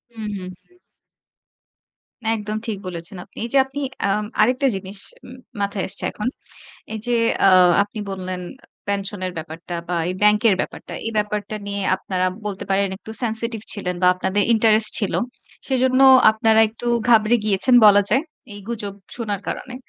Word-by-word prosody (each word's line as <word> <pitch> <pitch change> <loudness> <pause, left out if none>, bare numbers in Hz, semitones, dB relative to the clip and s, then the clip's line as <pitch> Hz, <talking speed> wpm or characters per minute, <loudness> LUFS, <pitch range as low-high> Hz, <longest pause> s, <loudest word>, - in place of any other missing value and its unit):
হু, 225 - -8 0.2
হুম, 185 -1 -7 0.2
হুম। 360 0 -28 1.6
একদম 215 0 -4
ঠিক 215 - -3
বলেছেন 175 +2 -6
আপনি। 195 - -24
এই 235 - -4
যে - - +4
আপনি 270 +2 -7 0.3
আম 210 +2 0 0.2
আরেকটা 255 +5 +2
জিনিস 195 +1 -7 0.3
উম 255 +1 -12 0.2
মাথায় 200 -1 -2
এসেছে - - 0
এখন। 210 - -5 0.7
এই 220 - -4
যে 245 - 0 0.3
আ - - +7 0.3
আপনি 205 +2 -8
বললেন 185 -1 -5 0.2
আ - - -19 0.2
পেনশনের 200 -2 -3
ব্যাপারটা 165 +2 -8
বা 175 - -1
এই 180 - -2
ব্যাংকের 210 0 +4
ব্যাপারটা। - - -6
এই 225 - -2
ব্যাপারটা 210 0 -2
নিয়ে 200 0 -3 0.2
আপনারা 185 -1 -2 0.2
বলতে 200 -2 -4
পারেন 195 +1 +2
একটু 220 - -12
sensitive 225 -1 -3
ছিলেন 185 -4 -3
বা 180 - +4
আপনাদের 190 +2 0
ইন্টারেস্ট 220 -1 +4
ছিল। 205 - -2 0.5
সেজন্য 260 0 +2 0.3
আপনারা 220 0 +3
একটু 235 +2 -10 0.2
ঘাবড়ে 230 0 +5
গিয়েছেন 215 +4 +3
বলা 205 0 +7
যায়। 265 +6 +3 0.3
এই 205 - -9
গুজব 205 -4 -5 0.2
শোনার 210 -5 -3
কারণে। 250 - -6
210 Hz, 160 wpm, -21 LUFS, 195-225 Hz, 1.6 s, আ